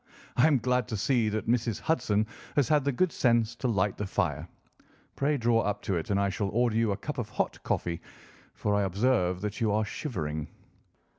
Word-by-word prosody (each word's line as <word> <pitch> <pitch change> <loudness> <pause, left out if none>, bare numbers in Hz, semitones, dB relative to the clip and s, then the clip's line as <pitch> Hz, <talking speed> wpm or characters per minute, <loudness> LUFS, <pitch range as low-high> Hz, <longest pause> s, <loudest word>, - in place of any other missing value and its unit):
Ha! 125 - +5
I - - +7
am 150 -3 +4
glad 125 -1 0
to 110 -3 -3
see 120 0 +2
that 110 +1 -2
Mrs. 115 -2 +1
Hudson 110 -9 +1 0.3
has 145 -4 +3
had 150 -2 +4
the 140 - +2
good 170 +7 +1
sense 115 -2 +2
to 130 - -1
light 105 -3 +1
the 105 - -3
fire. - - -1 0.7
Pray 145 +1 +1
draw 115 -2 +3
up 105 0 -2
to 100 - -1
it, 80 -2 -3
and 100 -1 +2
I 100 - +2
shall 100 0 -2
order 120 +2 +1
you 115 -2 +2
a 100 - -1
cup 145 +6 -5
of 115 - -3
hot - - -2
coffee, 85 -1 -2 0.5
for 105 - -1
I 100 - +3
observe 95 -2 +1
that 105 +3 -4
you 110 -2 +2
are 105 +1 +1
shivering." 80 - -4
110 Hz, 215 wpm, -29 LUFS, 100-125 Hz, 0.7 s, I